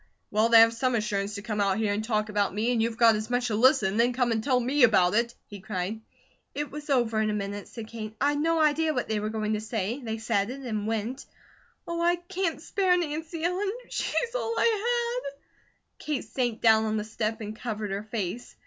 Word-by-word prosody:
"Well, 215 +2 +3
they 230 -1 +8
have 230 0 +6
some 255 +1 0
assurance 210 -2 -1
to 200 - -6
come 210 -1 -2
out 195 -1 +2
here 215 -2 +1
and 210 +1 -2
talk 215 -1 -1
about 205 -2 0
me, 225 +4 +1
and 235 -2 +1
you've 225 0 -1
got 230 -2 +6
as 215 +1 -4
much 245 0 0
to 215 - 0
listen, 250 -3 +4
and 205 +4 -2
then 240 +1 +3
come 245 -1 +1
and 220 -1 0
tell 255 -1 +2
me 265 +4 0
about 205 -7 +5
it," 235 +2 +1
he 205 - -10
cried. 190 +3 -4 0.5
"It 295 0 -3
was 295 0 -8
over 235 -5 +2
in 215 - +1
a - - 0
minute," 205 0 -4
said 230 -2 -8
Kate. 215 -1 -7
"I'd 290 +1 +2
no 330 +2 +2
idea 310 0 +2
what 250 - -1
they 220 -1 -1
were 210 +1 -2
going 215 -1 -2
to 215 - -1
say. 220 +3 -3
They 220 -1 -3
said 220 -2 0
it, 270 +2 -6
and 215 -5 -3
went. 225 +4 -3 0.6
Oh, 340 0 -2
I 345 +1 +3
can't 350 -1 -3
spare 365 +2 +1
Nancy 320 0 -4
Ellen, 370 +3 0 0.2
she's 480 -1 -1
all 460 -2 -2
I 475 +2 +1
had!" 280 0 -18 0.6
Kate 300 -6 -3
sank 235 0 -2
down 220 -1 +5
on 215 0 0
the 210 - -1
step 220 0 -3
and 215 -1 -6
covered 215 -3 -4
her 200 +1 -2
face. 215 +1 -5
230 Hz, 230 wpm, -27 LUFS, 215-290 Hz, 0.6 s, they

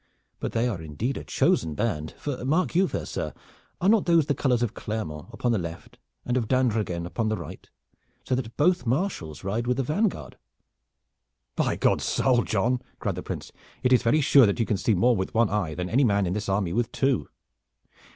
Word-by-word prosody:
But - - -4
they 115 +1 +1
are 100 -9 -3
indeed 80 - -3
a - - -5
chosen 80 -2 +1
band, 80 -8 -2
for 140 -4 -4
mark 155 +8 +1
you, 185 +3 +3
fair - - -4
sir, - - -4 0.4
are 185 - +1
not 215 -2 +4
those 165 -3 +4
the 145 - +1
colors 125 -3 +1
of 115 -2 -1
Clermont 95 -7 -5
upon 120 +1 -1
the 110 - +1
left, 85 -1 -8 0.3
and 125 +1 0
of 115 -4 -1
d'Andreghen 110 -9 0
upon 110 +5 -2
the 110 - -1
right, - - -9 0.5
so - - -2
that 120 -3 -3
both 175 -2 +2
marshals 125 - -2
ride 110 +5 -2
with 125 0 +1
the 135 - +1
vanguard?" 180 - -1 1.2
"By - - +1
God's - - +1
soul, 125 -2 +2
John!" 120 +4 0 0.2
cried - - -2
the - - -5
Prince, - - -6 0.3
"it 125 - +4
is 125 - +5
very 150 +7 +3
sure 135 -4 +6
that 100 - -1
you 115 - +2
can 105 - 0
see 105 +2 +1
more 120 +7 +4
with 95 +1 -3
one 115 -3 +3
eye 90 -7 -1
than 90 +1 -3
any 130 +9 +2
man 100 -4 +3
in 90 - -1
this 105 0 -3
army 95 -3 0
with 120 +2 0
two. 135 - 0
115 Hz, 210 wpm, -26 LUFS, 100-130 Hz, 1.2 s, sure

